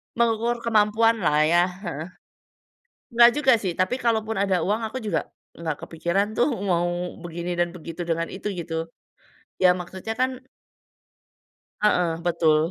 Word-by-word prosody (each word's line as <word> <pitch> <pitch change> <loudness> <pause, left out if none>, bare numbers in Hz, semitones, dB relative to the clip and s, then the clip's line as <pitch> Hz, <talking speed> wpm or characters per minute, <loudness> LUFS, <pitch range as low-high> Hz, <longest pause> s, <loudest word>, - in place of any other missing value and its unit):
Mengukur 235 0 +1
kemampuanlah 220 -5 +3
ya, 170 +3 +4 0.2
heeh. 170 - -3 1.2
Nggak 235 0 +8
juga 270 -3 +5
sih, 185 -3 -1
tapi 185 +6 +1
kalaupun 225 -1 0
ada 195 -2 +2
uang 210 +4 0
aku 260 - -6
juga 210 - -2 0.3
nggak 160 -2 -3
kepikiran 195 +6 -1
tuh 245 - +3 0.2
mau 175 -1 +2 0.4
begini 175 +1 -4
dan 175 0 +2
begitu 165 0 -7
dengan 165 0 0
itu 195 +2 -6
gitu. 165 -1 -4 0.7
Iya, 185 - +7
maksudnya 190 +4 -6
kan 260 0 +3 1.5
Heeh, 180 -5 +3 0.2
betul. 165 -3 +3
190 Hz, 130 wpm, -24 LUFS, 170-225 Hz, 1.5 s, Nggak